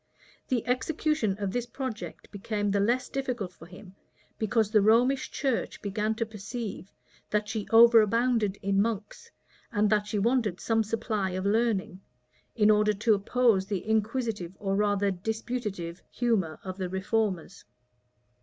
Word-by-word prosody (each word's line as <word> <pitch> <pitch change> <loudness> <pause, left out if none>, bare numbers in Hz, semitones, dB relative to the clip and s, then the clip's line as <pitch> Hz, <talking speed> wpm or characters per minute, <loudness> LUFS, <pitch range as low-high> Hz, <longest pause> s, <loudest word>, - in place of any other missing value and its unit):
The 245 -4 0
execution 255 -4 0
of 200 -2 -2
this 245 +2 -2
project 245 -2 -6
became 205 0 -2
the 200 - +1
less 240 +6 +1
difficult 250 -9 -3
for 165 - -14
him, 185 +1 -13 0.5
because 220 -1 +1
the 215 -2 +5
Romish 245 +6 +3
church 270 -5 -2
began 210 +1 -1
to 230 - -1
perceive, 215 -1 -6 0.4
that 210 0 0
she 215 -1 -4
overabounded 230 -2 +5
in 195 0 +2
monks, 215 -1 -3 0.4
and 210 0 +2
that 210 -1 +2
she 210 - -2
wanted 220 -3 +1
some 225 -1 +1
supply 215 -2 -2
of 185 - -3
learning, 205 -3 0 0.5
in 215 -2 +5
order 210 0 +3
to 220 +2 +2
oppose 205 -1 +2
the 200 -1 -3
inquisitive, 220 -4 -1
or 195 -1 -1
rather 205 -1 +2
disputative 205 -3 -4
humor 210 -10 0
of 185 0 -6
the 185 -1 -2
reformers. 190 -1 -2
215 Hz, 145 wpm, -28 LUFS, 200-230 Hz, 0.5 s, the